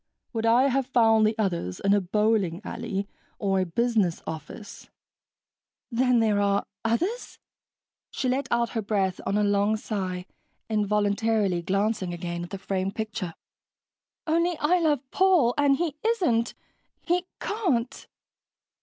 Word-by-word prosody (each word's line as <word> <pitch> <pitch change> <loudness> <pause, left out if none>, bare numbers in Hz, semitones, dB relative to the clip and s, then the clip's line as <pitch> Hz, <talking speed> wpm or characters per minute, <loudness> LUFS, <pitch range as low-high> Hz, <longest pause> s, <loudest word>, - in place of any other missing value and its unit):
Would 225 -1 0
I 235 +3 +5
have 270 -1 +1
found 225 -4 +4
the 220 +1 -1
others 175 - -2
in 200 0 +2
a 205 - +3
bowling 200 -2 +1
alley 205 -4 -4 0.3
or 195 -2 +1
a 185 - 0
business 215 -2 +1
office?" 160 +7 -8 1.0
"Then 250 +1 +3
there 215 -2 +2
are... 200 0 +1 0.2
others?" 345 - -1 0.7
She 260 - -3
let 260 +1 0
out 235 0 +1
her 225 - -2
breath 195 -3 -1
on 200 - +1
a 210 - +2
long 205 +1 +2
sigh 185 -4 -4 0.4
involuntarily 210 -2 +1
glancing 195 0 -1
again 175 0 -4
at 175 - -8
the 195 - -5
framed 195 0 -2
picture. 210 -6 -4 0.9
"Only 335 +1 +1
I 355 +4 +3
love 300 -5 +2
Paul, 360 -11 +4
and 285 -2 +3
he 335 -2 -1
isn't... 345 - +1 0.5
he 355 +1 0
can't...." 315 - -1
220 Hz, 135 wpm, -26 LUFS, 195-250 Hz, 1.0 s, I